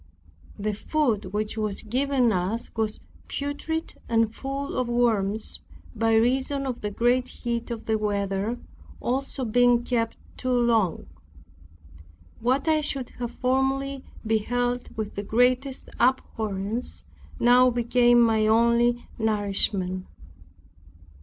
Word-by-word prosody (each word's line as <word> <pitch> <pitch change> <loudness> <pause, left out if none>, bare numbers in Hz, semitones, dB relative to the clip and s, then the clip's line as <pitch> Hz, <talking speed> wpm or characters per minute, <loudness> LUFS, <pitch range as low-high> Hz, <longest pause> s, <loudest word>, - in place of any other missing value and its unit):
The 210 +1 -2
food 230 -2 0
which 210 +3 -3
was 210 -2 -2
given 255 +1 +1
us 195 +5 -2
was 220 -1 -2 0.3
putrid 290 +3 -4
and 225 -1 +2
full 275 +2 -4
of 255 -1 0
worms, 220 -3 0 0.4
by 225 0 +2
reason 265 +4 +2
of 255 -3 -4
the 210 - -2
great 240 +4 +1
heat 235 -1 -4
of 230 -2 -5
the 220 -1 +1
weather, 200 +2 -1 0.4
also 265 +1 -2
being 245 +1 +4
kept 230 -2 -1 0.2
too 255 0 -1
long. 225 -7 +2 1.3
What 260 +6 +1
I 310 -1 +3
should 275 -4 -3
have 240 -1 -2
formerly 265 +2 0 0.2
beheld 245 +3 0
with 215 -1 -3
the 200 - -3
greatest 250 +5 +1
abhorrence, 220 -3 -1 0.4
now 250 +1 +6
became 240 0 +3
my 220 -2 +4
only 235 +2 +3
nourishment. 200 -3 +1
235 Hz, 115 wpm, -25 LUFS, 215-255 Hz, 1.3 s, now